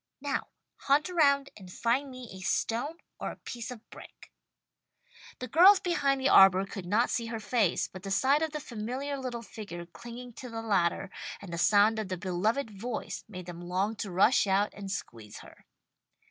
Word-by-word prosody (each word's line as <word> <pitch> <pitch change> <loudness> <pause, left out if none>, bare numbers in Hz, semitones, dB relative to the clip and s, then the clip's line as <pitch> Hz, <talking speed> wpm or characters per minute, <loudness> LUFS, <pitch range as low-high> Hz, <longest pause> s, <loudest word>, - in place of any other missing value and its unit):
Now! 280 0 -2 0.3
Hunt 295 +6 +2
around 280 -5 +3
and 185 -3 -12
find 250 +8 0
me 255 -1 -9
a 190 - -9
stone 235 - -1 0.2
or - - -3
a - - -7
piece 235 -2 -7
of 240 -3 -10
brick." - - -13 1.1
The 255 - -6
girls 365 - +7
behind 285 -6 +1
the 265 - +1
arbour 195 -5 +7
could 195 -2 -7
not 220 +6 +2
see 230 -1 -1
her 225 -1 -4
face, 210 -4 +1
but 185 - -11
the 195 - -6
sight 265 +9 +3
of 320 - +1
the 300 - -4
familiar 255 +3 -4
little 245 -3 -5
figure 185 -5 -8
clinging 240 +6 -10
to 250 - -7
the 225 -1 -5
ladder, 195 -3 +1 0.3
and 190 -4 -9
the 170 - -3
sound 210 +3 +4
of 215 - -3
the 185 -1 -3
beloved 205 +8 -1
voice 220 +3 -5
made 185 -4 -8
them 175 -1 -8
long 185 +5 -1
to 200 - -4
rush 195 +5 +4
out 195 +2 +2
and 200 -1 -8
squeeze 110 - -7
her. - - -17
225 Hz, 190 wpm, -29 LUFS, 195-260 Hz, 1.1 s, girls